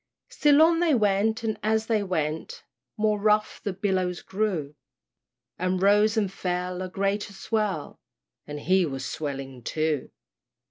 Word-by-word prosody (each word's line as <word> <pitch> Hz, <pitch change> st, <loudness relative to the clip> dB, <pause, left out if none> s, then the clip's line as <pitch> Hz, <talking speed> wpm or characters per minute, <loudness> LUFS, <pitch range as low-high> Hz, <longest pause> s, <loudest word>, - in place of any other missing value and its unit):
Still 295 Hz, +1 st, +5 dB
on 330 Hz, 0 st, +4 dB
they 335 Hz, -5 st, +3 dB
went, 215 Hz, +1 st, +1 dB
and 220 Hz, -1 st, -2 dB
as 220 Hz, +1 st, +1 dB
they 220 Hz, -2 st, +1 dB
went, 160 Hz, -5 st, -3 dB, 0.3 s
More 210 Hz, -1 st, +1 dB
rough 210 Hz, +1 st, +1 dB
the 205 Hz, -, -1 dB
billows 185 Hz, -2 st, -1 dB
grew, 190 Hz, -8 st, -2 dB, 0.9 s
And 185 Hz, +1 st, 0 dB
rose 210 Hz, +3 st, +4 dB
and 200 Hz, -3 st, 0 dB
fell, 180 Hz, 0 st, -3 dB
a 185 Hz, -, -4 dB
greater 200 Hz, +2 st, -1 dB
swell, 205 Hz, -6 st, -2 dB, 0.5 s
And 150 Hz, 0 st, -6 dB
he 185 Hz, +4 st, +3 dB
was 135 Hz, -5 st, -3 dB
swelling 135 Hz, -4 st, -5 dB
too! 155 Hz, +2 st, -1 dB
195 Hz, 140 wpm, -26 LUFS, 170-215 Hz, 0.9 s, Still